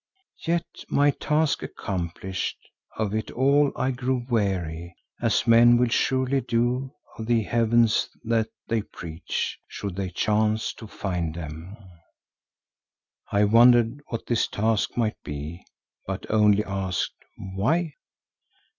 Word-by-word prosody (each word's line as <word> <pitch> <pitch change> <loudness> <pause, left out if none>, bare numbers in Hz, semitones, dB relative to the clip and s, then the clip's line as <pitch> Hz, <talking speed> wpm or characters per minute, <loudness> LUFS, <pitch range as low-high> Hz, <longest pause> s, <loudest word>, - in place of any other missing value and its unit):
Yet, 170 0 +1 0.2
my 145 0 +4
task 150 +1 0
accomplished, 95 0 -4 0.4
of 105 -2 -1
it 110 0 -2
all 140 +3 +3
I 130 - 0
grew 125 -1 -2
weary, 90 -7 -1 0.3
as - - +2
men 120 +1 +7
will 125 0 +2
surely 130 +3 +1
do 125 +3 0 0.3
of 110 - -5
the 115 -2 +3
heavens 115 0 +2
that 115 -1 +1 0.2
they 115 -1 +1
preach, 85 -5 -5
should 100 -3 -5
they 95 -1 -2
chance 110 +4 +1
to 110 - -8
find 90 -6 -3
them." 85 +4 -7 1.5
I 100 +1 +3
wondered 120 +4 +5
what 115 - -5
this 120 -1 +1
"task" 110 +1 0
might 110 -3 0
be, 75 +4 -6 0.4
but - - -4
only 105 -1 +4
asked, 95 -2 -2 0.2
"Why?" 130 - -1
110 Hz, 120 wpm, -25 LUFS, 95-120 Hz, 1.5 s, men